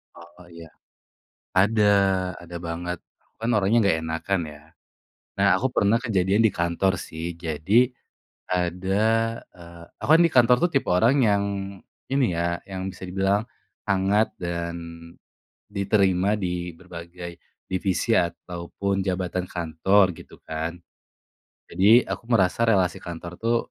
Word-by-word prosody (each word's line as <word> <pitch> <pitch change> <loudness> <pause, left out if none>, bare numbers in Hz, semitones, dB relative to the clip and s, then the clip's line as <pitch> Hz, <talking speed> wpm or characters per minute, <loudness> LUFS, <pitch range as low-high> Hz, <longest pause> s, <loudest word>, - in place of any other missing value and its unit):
Oh, 85 +1 -15
iya. 85 -1 -12 0.9
Ada 105 +2 +4 0.5
ada 85 0 -9
banget! 90 +1 -4 0.2
Aku - - -40
kan 115 - -1
orangnya 105 +3 +2
nggak 80 -5 +3
enakan 85 +4 -1
ya. 75 0 -14 0.8
Nah, 100 0 +4
aku 130 - 0
pernah 105 +3 +3
kejadian 100 -1 +2
di 110 - +4
kantor 85 +1 0
sih. 85 +1 -6
Jadi 90 - +2 0.6
ada 90 +2 -1 0.6
eee, 85 -1 -13 0.2
aku - - -4
kan - - +5
di 165 - +1
kantor 125 0 +6 0.2
tipe 135 - +1
orang 115 +10 +4
yang, 100 -3 +3 0.7
ini 135 -1 +3
ya, 85 0 -1
yang 95 0 -4
bisa 90 - -12
dibilang 95 +2 +1 0.5
hangat 100 +3 +2
dan 85 -1 -3 1.0
diterima 100 0 +2
di 90 -2 -3
berbagai 85 -1 -9 0.3
divisi 95 -1 0
ataupun 90 +3 -2
jabatan 90 -1 -2
kantor 85 +4 +2
gitu - - -14
kan. 80 +2 -4 0.9
Jadi 110 +6 +5
aku - - -5
merasa 100 0 +2
relasi 95 -5 +2
kantor 85 0 -7
tuh 115 +1 +2
95 Hz, 125 wpm, -24 LUFS, 85-100 Hz, 1.0 s, kantor